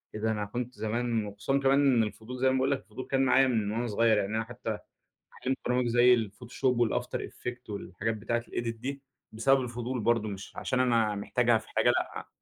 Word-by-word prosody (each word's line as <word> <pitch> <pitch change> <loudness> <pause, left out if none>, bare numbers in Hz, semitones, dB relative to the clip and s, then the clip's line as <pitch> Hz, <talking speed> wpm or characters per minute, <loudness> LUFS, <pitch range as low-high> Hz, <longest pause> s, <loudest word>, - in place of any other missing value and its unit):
إيه 110 - -5
ده 110 0 +1
أنا 105 -1 -2
كنت 120 +4 -4
زمان 115 0 -1
وخصوصًا 110 +7 -1
كمان 135 0 +4 0.2
إن 115 - +4
الفضول- 110 +4 -6
زي 130 - +5
ما - - +2
باقول 130 +1 +2
لك- 140 - +1
الفضول 115 +4 -8
كان 135 0 +3
معايا 135 +1 +5
من 110 -5 0
وأنا 120 +2 -1
صغير، 110 0 +3
يعني 105 +2 -1
أنا 110 - 0
حتى 110 -2 -5 0.6
اتعلمت 130 +1 -1
برامج 125 0 +1
زي 120 +1 +6
الفوتوشوب 120 +2 0
والafter - - -2
effect 125 -1 -7
والحاجات 105 +2 -3
بتاعة 120 +2 -1
الedit 115 -1 -4
دي 135 +2 -4 0.3
بسبب 130 +5 +3
الفضول 120 +1 -3
برضو 115 -1 +2
مش 100 -1 -7
عشان 130 - -1
أنا 115 -4 +2
محتاجها 115 +3 +2
في 110 - -10
حاجة - - +2
لأ. - - -1
120 Hz, 205 wpm, -29 LUFS, 110-125 Hz, 0.6 s, زي